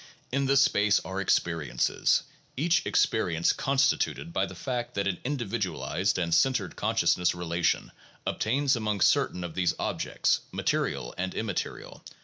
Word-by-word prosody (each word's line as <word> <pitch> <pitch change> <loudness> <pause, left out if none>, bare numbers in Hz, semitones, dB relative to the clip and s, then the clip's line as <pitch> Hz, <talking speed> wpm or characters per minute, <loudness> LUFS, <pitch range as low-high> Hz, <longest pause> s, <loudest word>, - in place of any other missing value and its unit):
In 140 +1 0
this 135 0 +5
space 105 -4 +3
are 95 +1 -4
experiences, 85 -5 +1 0.3
each 165 +5 +2
experience 85 -1 +2
constituted 140 +4 0
by - - +1
the - - -10
fact 125 -2 -4
that 100 - 0
an 95 -2 -1
individualized 105 -6 -1
and 85 -2 -1
centered 100 -1 +2
consciousness 90 -1 +1
relation 85 0 -1 0.3
obtains 135 +5 +1
among 105 -4 -2
certain 90 - +2
of 85 -2 -6
these 90 -1 +1
objects, - - 0
material - - -1
and 95 +1 -2
immaterial. 110 -4 -4
100 Hz, 130 wpm, -28 LUFS, 90-130 Hz, 0.3 s, this